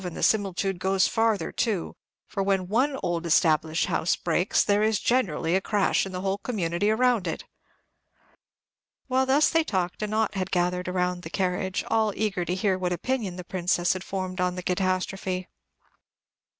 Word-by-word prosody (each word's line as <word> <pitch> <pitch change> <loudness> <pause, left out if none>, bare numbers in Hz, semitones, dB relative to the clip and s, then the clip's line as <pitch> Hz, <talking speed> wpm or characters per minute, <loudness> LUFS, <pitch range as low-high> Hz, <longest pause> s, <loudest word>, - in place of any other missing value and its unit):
and 180 -2 -5
the - - -4
similitude 195 -3 +1
goes 190 0 +2
farther 225 -2 +1
too; 210 -8 -1 0.3
for 200 - -4
when 195 -2 +1
one 260 +8 +1
old 175 -2 -1
established 160 -1 +2
house 165 - +1
breaks, 175 +3 +1
there 205 0 +2
is 215 -1 +2
generally 180 -9 +1
a 190 - +2
crash 200 -1 +1
in - - -8
the 180 0 -4
whole 195 +1 -1
community 200 -4 -1
around 230 -3 +2
it." 165 - -3 1.6
While 260 0 +1
they 265 - +3
thus 300 +2 +4
talked, 180 -2 -2
a 210 - -1
knot 215 0 0
had 190 -1 -2
gathered 180 0 0
around 180 -1 -1
the 160 - -8
carriage, 185 0 -1
all 220 -2 +1
eager 205 -4 -1
to 175 +2 -1
hear 190 -1 0
what 180 -1 -1
opinion 215 -1 -2
the 180 - -7
Princess 175 -1 0
had 185 0 -6
formed 185 -1 -4
on 180 0 0
the 180 - -5
catastrophe. 185 0 -1
190 Hz, 175 wpm, -26 LUFS, 180-210 Hz, 1.6 s, thus